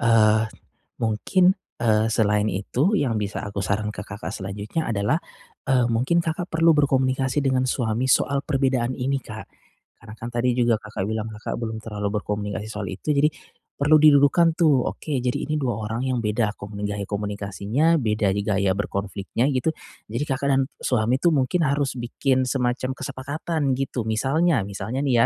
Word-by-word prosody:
eee, 110 -1 +4 0.5
mungkin, 180 - +2 0.2
eee, 110 -1 +2
selain 105 -1 +2
itu 125 - 0
yang 120 -5 0
bisa 105 -1 -2
aku 100 -1 -4
saran 105 +3 -1
ke 100 -3 -5
Kakak 100 +1 -6
selanjutnya 100 +10 -4
adalah, 105 +5 +1 0.5
eee, 130 -3 +2
mungkin 125 +9 +2
Kakak 170 +2 -3
perlu 165 0 +4
berkomunikasi 130 -1 +2
dengan 130 -2 +1
suami 120 -2 0
soal 140 0 +2
perbedaan 130 -5 +1
ini 135 +1 -1
Kak, 110 -1 -8 0.5
karena 110 -2 -11
kan 115 - -5
tadi 125 +1 +1
juga 120 -1 +4
Kakak 105 -2 -4
bilang 110 0 -3
Kakak 105 0 -5
belum 110 -1 -4
terlalu 105 -1 -3
berkomunikasi 105 0 -4
soal 105 -3 -5
itu. 145 +10 -2
Jadi 145 +2 +4 0.5
perlu 150 +2 +5
didulukan 150 +3 +6
tuh, 145 -7 +4
oke 155 - -7
jadi 125 - 0
ini 155 - -1
2 130 -7 -1
orang 110 +2 -3
yang 125 -2 0
beda 105 0 0
komuni 100 +1 -7
gaya 100 0 -3
komunikasinya, 105 - 0
beda 105 -4 +1
di 100 - 0
gaya 100 -2 +1
berkonfliknya 100 +3 -2
gitu, 130 +5 +1 0.4
jadi 120 +6 -1
Kakak 140 0 -1
dan 135 0 +3 0.2
suami 120 0 +1
itu 175 - +4
mungkin 150 +4 +1
harus 140 -1 0
bikin 130 +2 0
semacam 130 0 0
kesepakatan 145 +2 -3
gitu. 135 -3 -2
Misalnya 135 - +1
misalnya 110 +6 -4
nih 130 -3 +2
120 Hz, 165 wpm, -24 LUFS, 105-135 Hz, 0.5 s, didulukan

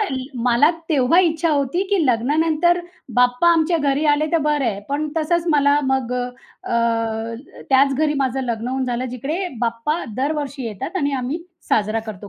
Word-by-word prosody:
अ, 425 - 0 0.4
मला 245 +6 +4 0.2
तेव्हा 305 +3 +4
इच्छा 330 -1 +1
होती 285 +5 0
की 380 -6 +2
लग्नानंतर 315 +8 +2 0.3
बाप्पा 250 +6 +3
आमच्या 330 +1 +2
घरी 285 0 0
आले 305 +1 0
तर 335 - +4
बरं 295 -2 +1
आहे. 205 -4 -1
पण 295 +2 -1
तसंच 330 +2 +1
मला 285 0 +4
मग 255 -2 -1
अ, 230 -2 -2 0.4
त्याच 270 +1 +4
घरी 300 +1 +1
माझं 265 -1 0
लग्न 235 -1 -3
होऊन 260 0 -1
झालं 245 0 -2
जिकडे 300 +10 -3
बाप्पा 235 +8 -1
दरवर्षी 280 -1 -2
येतात 225 - -5
आणि 285 -4 0
आम्ही 305 +7 -3 0.3
साजरा 215 +1 +1
करतो 205 -1 -8
275 Hz, 160 wpm, -20 LUFS, 245-315 Hz, 0.4 s, मला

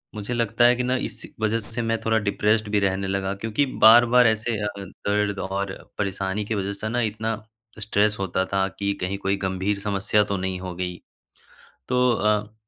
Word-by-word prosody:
मुझे 105 +3 -4
लगता 115 0 +2
है 120 +1 +6
कि 125 - -2
ना 125 +1 +1
इस - - -9
वजह 110 +1 +1
से 115 +2 -4
मैं 115 0 0
थोड़ा 110 0 +3
डिप्रेस्ड 105 +2 +1
भी 105 0 +2
रहने 95 0 0
लगा, 95 0 -1
क्योंकि 110 +7 -1 0.2
बार-बार 120 +2 +8
ऐसे 110 +1 0
अ, 105 - 0 0.2
दर्द 100 +1 -2
और 100 0 -3 0.2
परेशानी 100 +1 -2
की 110 - -2
वजह 100 0 -2
से 110 +2 -5
ना 120 +2 0
इतना 110 0 -1 0.4
स्ट्रेस 105 0 +1
होता 95 -1 0
था 95 0 0
कि 100 0 0
कहीं 95 +2 -2
कोई 100 0 0
गंभीर 95 +2 -1
समस्या 100 +1 +1
तो 100 -1 -2
नहीं 95 0 -3
हो 90 -1 -6
गई। 90 0 -4 0.9
तो 125 0 +3
अ, 105 0 0
105 Hz, 190 wpm, -24 LUFS, 95-110 Hz, 0.9 s, बार-बार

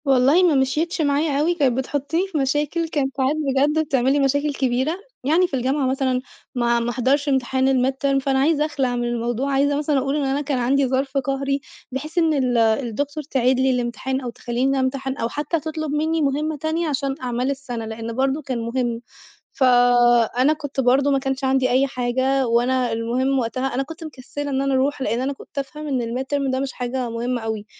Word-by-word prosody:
والله 275 +6 +4
ما 340 -5 +4
مشيتش 305 +6 0
معايا 285 0 +1
أوي 335 +4 +2
كانت 265 -7 +1
بتحطني 285 +7 -1
في 365 -5 -4
مشاكل، 295 +4 0
كانت 275 -4 -2
ساعات 265 +2 +1
بجد 295 +1 +1
بتعمل 265 -2 +2
لي 290 - +2
مشاكل 285 +2 +1
كبيرة 260 +4 0 0.3
يعني 325 +7 +3
في - - -24
الجامعة 265 +2 0
مثلًا 260 -1 0 0.3
ما 235 -1 +2
ما 235 0 -2
احضرش 265 +4 +1
امتحان 265 0 +1
الmidterm 270 +1 +1
فأنا 270 -1 +1
عايزة 300 +2 +2
أخلع 270 -5 -1
من 240 - -1
الموضوع، 240 +3 -1
عايزة 285 +1 +2
مثلًا 295 -1 +1
أقول 270 +2 0
إن 295 - 0
أنا 270 +2 0
كان 280 -2 -1
عندي 265 +3 +2
ظرف 270 +2 -1
قهري 275 +1 -1 0.3
بحيث 300 +6 -6
إن 325 -2 +3
ال 255 -4 +1
الدكتور 240 +6 0
تعيد 260 -2 +1
لي 265 0 +3
الإمتحان 250 +2 -2
أو 250 - -4
تخليني 250 +3 -1
امتحن 265 +1 -2
أو 230 - -1
حتى 300 +5 -2
تطلب 310 -1 -4
مني 315 +2 0
مهمَّة 300 +2 0
تانية 315 +3 -1
علشان 275 -2 -1
أعمال 250 +2 -1
السنة، 245 -5 -5
لأن 225 +1 -5
برضه 270 +3 0
كان 260 -4 -3
مُهم، 235 0 -2 0.5
فأنا 245 +1 +4
كنت 290 -3 -6
برضه 270 +2 +3
ما 275 - +2
كانش 270 0 -3
عندي 265 -1 +2
أي 260 +3 +3
حاجة 260 +1 0
وأنا 245 +1 +1
المُهم 250 +4 0
وقتها 255 +3 -2
أنا 270 - 0
كنت 325 +3 -10
مكسلّة 290 -1 -6
إن 265 0 0
أنا 275 0 0
أروح، 270 +1 +1
لإن 240 -1 0
أنا 275 +2 -1
كنت 275 - -16
أفهم 300 +2 -5
إن 265 -4 0
الmidterm 265 +4 -2
ده 260 - 0
مش 270 -1 -3
حاجة 250 0 -3
مُهمَّة 240 +1 -2
أوي، 220 -2 -4
270 Hz, 195 wpm, -22 LUFS, 250-285 Hz, 0.5 s, والله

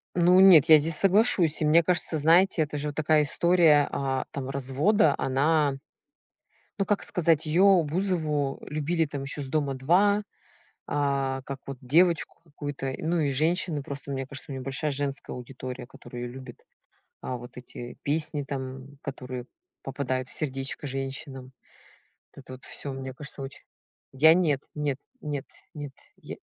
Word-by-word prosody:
Ну 180 +1 +5
нет, 180 -6 +8
я 155 -1 +9
здесь 155 +1 +5
соглашусь. 195 -5 +3
И - - +2
мне 160 +3 +5
кажется, 170 -1 0
знаете, 165 +3 +4
это 150 0 -4
же 150 +1 -3
вот 145 - -7
такая 155 0 +3
история, 160 0 +4
а, 135 -1 -1
там, 135 -2 -5
развода 140 - +2
она, 145 +2 +2 1.0
ну 195 - 0
как 205 - 0
сказать? 165 -5 +2
Её, 185 +3 +5
Бузову, 155 -4 -1
любили, 160 +2 0
там, 140 -2 -6
ещё 145 +1 -3
с 135 - -4
"Дома-2". 155 +9 +2 0.6
А, 140 -2 -1
как 135 0 -6
вот 135 -1 -7
девочку 165 +5 +2
какую-то, 145 -3 -5
ну 165 +1 0
и 145 - +1
женщины 155 +1 0
просто, 140 0 -7
мне 135 -1 -3
кажется 140 +1 -7
у - - -4
неё 130 - -5
большая 135 +3 -2
женская 140 0 -3
аудитория, 125 0 -8
которая 120 -1 -10
её 120 - -6
любит. 130 -2 -11 0.6
А 125 - -3
вот 120 +1 -12
эти 120 -1 -9
песни 150 -1 -1
там, 135 0 -7
которые 125 -3 -6 0.4
попадают 130 -1 -3
в - - -10
сердечко 135 0 -4
женщинам. 135 0 -6 0.8
Вот 140 - -12
это - - -11
вот 130 - -14
всё 140 - -5
мне 130 -1 -7
кажется 145 0 -7
очень. 135 0 -8 0.5
Я 160 +5 +6
нет, 155 -7 +1
нет, 145 -3 -2 0.2
нет, 145 -5 -4 0.3
нет. 145 -2 -7 0.2
Я. - - -10
145 Hz, 160 wpm, -26 LUFS, 135-160 Hz, 1.0 s, я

